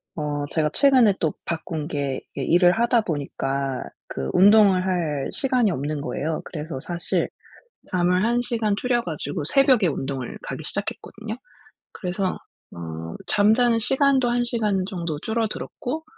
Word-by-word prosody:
어 145 -2 -2
제가 155 -2 +1
최근에 255 -8 +5
또 160 -3 0
바꾼 160 -2 -3
게 140 -4 -2
이 - - -3
일을 175 +1 +5
하다 235 0 +3
보니까 140 - -2 0.2
그 65 -1 -4
운동을 195 -1 +6
할 165 -7 -1
시간이 255 -6 +2
없는 145 -1 -3
거예요. 155 +2 -3
그래서 155 -3 -6
사실 170 +5 -2 0.6
잠을 180 +1 +2
1 240 +1 +2
시간 225 -4 0
줄여 240 +2 +1
가지고 150 -4 -4
새벽에 260 - +4
운동을 135 -3 -4
가기 - - -6
시작했거든요. 220 0 -4 0.6
그래서 185 0 -2 0.4
어 80 -1 -6
잠자는 225 +3 +4
시간도 265 +2 +3
1 240 0 +1
시간 215 -6 0
정도 170 -6 -3
줄어들었고 230 - -3
180 Hz, 290 characters per minute, -23 LUFS, 150-230 Hz, 0.6 s, 운동을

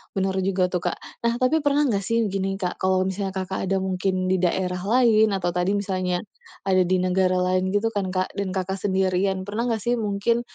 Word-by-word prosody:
benar 190 0 0
juga 185 -1 +1
tuh, 180 - 0
Kak. - - -5 0.2
Nah, 235 0 +1
tapi 275 +5 +2
pernah 290 0 +2
nggak 205 -6 +1
sih, 230 +4 -1
begini, 195 -1 -2
Kak, 180 -2 -4
kalau 185 0 +2
misalnya 190 +1 -2
Kakak 190 0 -3
ada 195 - +2
mungkin 185 0 -1
di 190 - +3
daerah 180 0 0
lain, 220 0 +4
atau 175 -2 -1
tadi 180 +3 +1
misalnya 185 -2 -1 0.5
ada 185 -1 +3
di 185 - +2
negara 185 0 +2
lain, 185 +1 +1
gitu 205 +2 +2
kan, 195 -2 -1
Kak, 185 0 -2
dan 200 -1 -3
Kakak 190 +1 -2
sendirian, 190 0 +1
pernah 225 +4 -2
nggak 225 -3 -1
sih, 240 - +2
mungkin, 210 +3 0
190 Hz, 205 wpm, -24 LUFS, 185-205 Hz, 0.5 s, lain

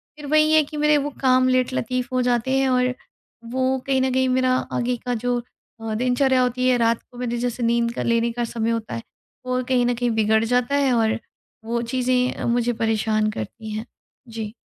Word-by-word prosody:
फिर 300 -1 -10
वही 310 +1 +4
है 310 -1 +6
कि 300 +1 -8
मेरे 300 0 +4
वो 290 0 -1
काम 255 -1 +4
लेटलतीफ़ 255 -1 0
हो 255 - +2
जाते 245 +1 +1
हैं। 270 0 +2
और 250 0 +2 0.6
वो 260 +1 +1
कहीं 265 -1 +2
न 260 0 +1
कहीं 260 0 +2
मेरा 255 0 +2 0.2
आगे 245 0 0
का 245 - 0
जो 245 -1 0 0.5
अ, - - -2
दिनचर्या 255 +2 +2
होती 250 0 0
है 255 - +4
रात 230 -1 +1
को 245 - -14
मेरे 240 -1 -2
जैसे 245 0 -2
नींद 235 0 +1
का - - -3
लेने 235 0 +1
का 240 +1 -3
समय 230 -1 -2
होता 230 -1 -3
है 115 - -6 0.4
वो 255 0 0
कहीं 250 -2 +3
न 245 - +2
कहीं 245 +1 0
बिगड़ 220 0 +3
जाता 250 +3 +1
है। 280 -2 +2
और 225 -2 +1 0.5
वो 235 +1 -1
चीज़ें 255 0 0
मुझे 240 0 +1
परेशान 220 -1 0
करती 215 - -7
हैं। 215 +2 -4 0.4
जी। 220 -2 -6
245 Hz, 205 wpm, -22 LUFS, 230-255 Hz, 0.6 s, है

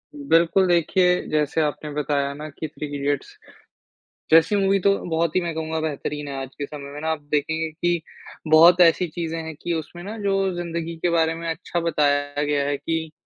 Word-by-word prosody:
बिल्कुल 190 - +3
देखिए, 180 +1 +3
जैसे 155 +1 +1
आपने 150 0 -2
बताया 140 -1 -1
ना 150 +2 -7
कि 155 +2 -6
3 150 0 -7
इडियट्स 140 0 -2 0.9
जैसी 165 +5 +6
मूवी 195 0 +2
तो 195 +1 +3
बहुत 165 0 0
ही - - +5
मैं 170 -2 -3
कहूँगा 160 0 -2
बेहतरीन 150 -1 -4
है 140 - -5
आज 135 - -6
के 145 - -3
समय 140 -1 -9
में 145 - -7
ना 160 - -2
आप 155 -2 -3
देखेंगे 160 +2 0
कि 175 +1 -1 0.5
बहुत 170 +3 +7
ऐसी 175 +1 +5
चीज़ें 165 0 -4
हैं 160 -1 -7
कि 175 - -2
उसमें 165 +2 -5
ना 215 +3 -6
जो 200 -2 0 0.2
ज़िंदगी 170 -1 -4
के 175 +2 0
बारे 165 -1 +2
में 165 0 -6
अच्छा 170 +1 -3
बताया 145 -3 +1
गया 145 -1 +1
है 145 -1 0
कि 160 0 -3
160 Hz, 195 wpm, -23 LUFS, 150-170 Hz, 0.9 s, बहुत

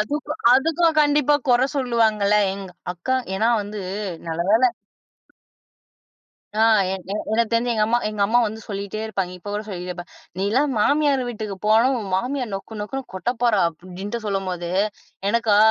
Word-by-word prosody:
அதுக்கோ 295 +7 -2 0.2
அதுக்கும் 325 +4 +2
கண்டிப்பா 295 -1 +3
குற 245 0 +5
சொல்லுவாங்கல. 220 -6 +2 0.2
எங்க 195 -1 -8 0.2
அக்கா 180 +10 -1 0.2
ஏன்னா 220 +4 +2
வந்து, 205 +1 -6 0.5
நல்லவேள. 185 +8 +2 1.9
ஆ. - - +1 0.3
எ - - 0 0.2
எனக்குத் 220 +2 0
தெரிஞ்சு 235 +1 +2
எங்க 215 -2 +2
அம்மா 235 +2 +2
எங்க 215 - -6
அம்மா 230 +4 +3
வந்து 220 0 -4
சொல்லிட்டே 200 +1 -4
இருப்பாங்க. 195 -4 -3
இப்பகூட 205 +3 -4
சொல்லிட்டே 180 -3 -5
இருப்பாங்க, 175 0 -8 0.3
"நீன்லாம் 235 +10 +1
மாமியார் 285 +3 +3
வீட்டுக்குப் 210 -4 -6
போன, 220 +4 +5
உன் 215 -4 -5
மாமியார் 250 +3 -2
நொக்கு 210 +3 -7
நொக்குன்னு 265 +6 -4
கொட்டப்போறா" 235 +2 +1
அப்பிடின்ட்டு 185 +6 -7
சொல்லும்போது, 185 -3 -2 0.6
எனக்கா, 225 -2 +2
215 Hz, 140 wpm, -22 LUFS, 195-245 Hz, 1.9 s, குற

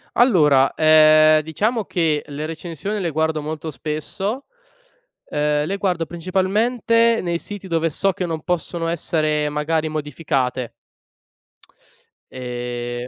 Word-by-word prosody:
Allora, 150 - +4
ehm, 155 0 +6
diciamo 210 - -1
che, 160 -5 0
le 150 +1 -5
recensioni 165 +5 -5
le 175 - -1
guardo 160 0 0
molto 155 +2 -5
spesso, 190 - -4 0.8
ehm, 150 0 0
le 195 +5 -2
guardo 180 -4 -1
principalmente 215 +7 +1
nei 170 -1 -1
siti 205 0 -8
dove 165 -1 0
so 195 +6 0
che 185 -1 -4
non 160 -2 -4
possono 170 -1 -2
essere 155 -2 0
magari 155 +2 -1
modificate. 135 -5 -2 1.6
Ehm, 120 -1 -5
160 Hz, 115 wpm, -21 LUFS, 150-185 Hz, 1.6 s, ehm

